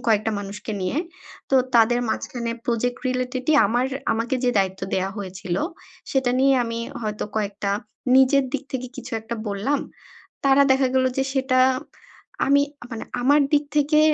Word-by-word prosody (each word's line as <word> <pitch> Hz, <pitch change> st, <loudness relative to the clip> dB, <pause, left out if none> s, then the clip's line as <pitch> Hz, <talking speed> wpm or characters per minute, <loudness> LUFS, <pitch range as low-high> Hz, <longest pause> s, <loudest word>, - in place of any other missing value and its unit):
কয়েকটা 220 Hz, -1 st, +2 dB
মানুষকে 205 Hz, +2 st, -6 dB
নিয়ে। 185 Hz, +8 st, -2 dB, 0.5 s
তো -, -, +3 dB, 0.2 s
তাদের 240 Hz, +1 st, +5 dB
মাঝখানে 235 Hz, +1 st, -3 dB, 0.2 s
প্রজেক্ট 245 Hz, +1 st, 0 dB
রিলেটেডই 255 Hz, +2 st, -1 dB
আমার 240 Hz, +5 st, +1 dB, 0.3 s
আমাকে 230 Hz, +4 st, -1 dB
যে 250 Hz, -, +4 dB
দায়িত্ব 190 Hz, -1 st, 0 dB
দেয়া 190 Hz, +1 st, 0 dB
হয়েছিল 185 Hz, -2 st, -4 dB, 0.5 s
সেটা 265 Hz, -2 st, +1 dB
নিয়ে 270 Hz, 0 st, +5 dB
আমি 230 Hz, 0 st, -4 dB, 0.2 s
হয়তো 210 Hz, -1 st, -3 dB
কয়েকটা 200 Hz, -1 st, -2 dB, 0.5 s
নিজের 265 Hz, +1 st, +5 dB
দিক 285 Hz, -, -1 dB
থেকে 255 Hz, -1 st, -3 dB
কিছু 260 Hz, 0 st, -8 dB
একটা 230 Hz, +2 st, -5 dB
বললাম। 215 Hz, +9 st, 0 dB, 0.6 s
তারা 275 Hz, 0 st, +6 dB
দেখা 265 Hz, 0 st, +2 dB
গেল 260 Hz, 0 st, +3 dB
যে -, -, +3 dB
সেটা 260 Hz, -1 st, +2 dB, 0.9 s
আমি 280 Hz, +1 st, +5 dB, 0.3 s
মানে 225 Hz, -, -5 dB, 0.2 s
আমার 285 Hz, +4 st, +5 dB
দিক 295 Hz, 0 st, +4 dB
থেকে 300 Hz, +1 st, +4 dB
245 Hz, 150 wpm, -23 LUFS, 215-270 Hz, 0.9 s, তারা